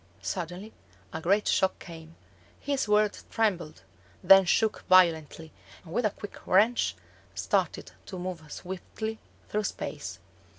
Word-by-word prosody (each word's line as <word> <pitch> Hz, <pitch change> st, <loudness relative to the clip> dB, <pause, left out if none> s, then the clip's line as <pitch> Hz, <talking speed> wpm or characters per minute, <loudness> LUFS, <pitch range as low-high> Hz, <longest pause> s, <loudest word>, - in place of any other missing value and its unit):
Suddenly 180 Hz, -, -5 dB, 0.4 s
a 160 Hz, -, -4 dB
great 200 Hz, +5 st, +2 dB
shock 190 Hz, 0 st, +2 dB
came: 165 Hz, -1 st, -11 dB, 0.4 s
his 280 Hz, -4 st, -1 dB
World 210 Hz, 0 st, +2 dB
trembled, 180 Hz, -, -1 dB, 0.4 s
then 195 Hz, -1 st, +8 dB
shook 220 Hz, +4 st, +1 dB
violently, 165 Hz, -3 st, +3 dB, 0.3 s
and, 165 Hz, -, -10 dB
with 235 Hz, 0 st, +2 dB
a -, -, -1 dB
quick 205 Hz, 0 st, -11 dB
wrench, 220 Hz, +6 st, +3 dB, 0.4 s
started -, -, -1 dB, 0.2 s
to 190 Hz, -, -7 dB
move 175 Hz, -4 st, -6 dB
swiftly 220 Hz, +4 st, -6 dB, 0.3 s
through 210 Hz, 0 st, -1 dB
space. -, -, -5 dB
190 Hz, 125 wpm, -28 LUFS, 170-210 Hz, 0.4 s, then